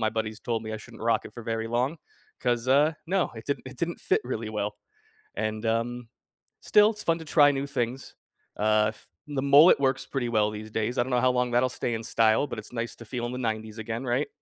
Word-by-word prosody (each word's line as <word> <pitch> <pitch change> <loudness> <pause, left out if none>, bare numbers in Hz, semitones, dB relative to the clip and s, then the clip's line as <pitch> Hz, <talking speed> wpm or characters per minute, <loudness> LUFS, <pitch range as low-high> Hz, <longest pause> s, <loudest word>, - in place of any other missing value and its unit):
my 110 0 +1
buddies 110 0 -3
told 115 -2 -2
me 110 - -5
I - - -3
shouldn't 110 +1 -12
rock 115 0 +2
it - - -10
for 120 - -9
very 115 0 -2
long, 125 +7 0 0.4
'cause, 120 -1 0
uh, 145 +4 +4
no, 190 +1 +1
it 110 - -8
didn't 140 -2 -2
it 130 - -9
didn't 170 +3 -3
fit - - +2
really 115 -3 -3
well," 105 -1 -3 0.6
and, 110 +1 -2
um, 115 +1 -1 0.5
still, 210 0 +5
it's 215 - -8
fun 165 0 +1
to 160 - -9
try 145 -2 +5
new 140 0 -2
things. 130 -1 -3 0.4
Uh, 105 0 +3
f 110 - -13 0.2
the 135 -2 -1
mullet 140 +4 +7
works 135 -1 +1
pretty 130 -3 -2
well 105 -2 +2
these 110 0 -8
days, 110 +4 -1
I 120 - +4
don't 130 - -6
know 125 -1 +2
how 130 0 +4
long 125 -1 0
that'll 125 +1 +3
stay 120 - -3
in 115 0 -3
style, 110 +5 +3
but 120 - -6
it's 110 - -11
nice 115 0 -3
to 115 - -11
feel 120 +1 -4
in - - -5
the 125 - -4
‘90s 110 -2 -3
again, 115 +3 -4
right? 125 +4 0
120 Hz, 240 wpm, -27 LUFS, 110-135 Hz, 0.6 s, mullet